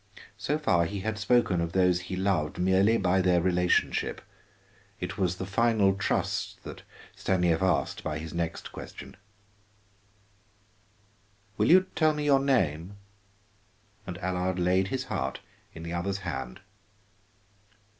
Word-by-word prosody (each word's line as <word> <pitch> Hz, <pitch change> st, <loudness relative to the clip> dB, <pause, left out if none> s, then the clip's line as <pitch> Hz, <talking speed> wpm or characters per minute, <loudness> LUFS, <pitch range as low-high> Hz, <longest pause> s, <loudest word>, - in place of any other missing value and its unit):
So 145 Hz, +10 st, 0 dB
far 90 Hz, -, +2 dB
he 100 Hz, +3 st, -4 dB
had 110 Hz, +1 st, -3 dB
spoken 105 Hz, -5 st, +2 dB
of 85 Hz, 0 st, -3 dB
those 90 Hz, -2 st, +3 dB
he 90 Hz, 0 st, -5 dB
loved 95 Hz, -5 st, 0 dB
merely 95 Hz, +5 st, +3 dB
by 95 Hz, -1 st, +2 dB
their 90 Hz, -1 st, +3 dB
relationship. 90 Hz, 0 st, +1 dB, 0.8 s
It 90 Hz, +2 st, -5 dB
was 90 Hz, -2 st, +1 dB
the 95 Hz, -, -5 dB
final 100 Hz, 0 st, +2 dB
trust 95 Hz, 0 st, -2 dB
that -, -, -9 dB, 0.3 s
Stanief 90 Hz, -3 st, +1 dB
asked 95 Hz, -2 st, 0 dB
by -, -, -3 dB
his 80 Hz, 0 st, -7 dB
next 85 Hz, -1 st, -4 dB
question: -, -, -10 dB, 2.4 s
"Will -, -, +1 dB
you 185 Hz, +3 st, +7 dB
tell 155 Hz, -1 st, +3 dB
me 150 Hz, 0 st, -3 dB
your 140 Hz, -2 st, +5 dB
name?" 95 Hz, -, 0 dB, 1.1 s
And 90 Hz, -2 st, -5 dB
Allard 90 Hz, 0 st, -1 dB
laid 90 Hz, +1 st, +2 dB
his 130 Hz, +4 st, -2 dB
heart -, -, -3 dB, 0.3 s
in 80 Hz, -, -10 dB
the 85 Hz, +1 st, -5 dB
other's 95 Hz, +3 st, -2 dB
hand. 65 Hz, 0 st, -5 dB
95 Hz, 135 wpm, -28 LUFS, 85-100 Hz, 2.4 s, you